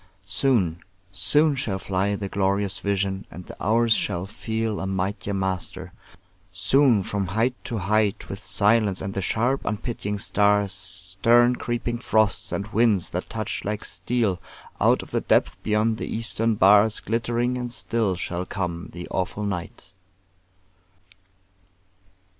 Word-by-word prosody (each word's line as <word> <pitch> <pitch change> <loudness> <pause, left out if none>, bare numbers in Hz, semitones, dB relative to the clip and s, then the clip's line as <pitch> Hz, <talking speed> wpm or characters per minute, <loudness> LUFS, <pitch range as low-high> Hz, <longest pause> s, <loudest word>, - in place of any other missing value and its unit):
Soon, 95 -4 +1 0.3
soon 145 - +3
shall 115 -8 -1
fly 95 +1 -1
The 100 -1 -4
glorious 100 0 0
vision, 100 0 -2
and 90 +1 -10
the - - -10
hours 115 +2 +4
shall 90 -3 +1
feel 110 +1 -3
A 95 - -3
mightier 95 +2 -2
master; 95 -1 -4 0.6
soon 105 +4 +3
from 100 0 -2
height 110 +7 +1
to 115 - -3
height, 105 +2 0
With 95 - -7
silence 100 +1 +2
and 95 +1 -4
the 100 - -2
sharp 120 +8 0
unpitying 105 -1 -3
stars, 105 -1 +2
Stern 100 +6 +3
creeping 120 0 -3
frosts, 110 -5 +1
and 100 - -2
winds 105 -5 +3
that 90 - -4
touch 110 -3 -4
like 105 0 -3
steel, 95 +2 -1 0.4
Out - - +3
of - - -14
the - - 0
depth - - +1
beyond 110 +1 +1
the - - -5
eastern 115 0 0
bars, 105 +2 +5
Glittering 120 +2 -1
and 125 -1 -4
still 115 -5 0
shall 90 0 -4
come 90 -3 -4
the 85 +1 -7
awful 95 +3 -2
night. 95 -2 -5
100 Hz, 140 wpm, -24 LUFS, 95-115 Hz, 0.6 s, bars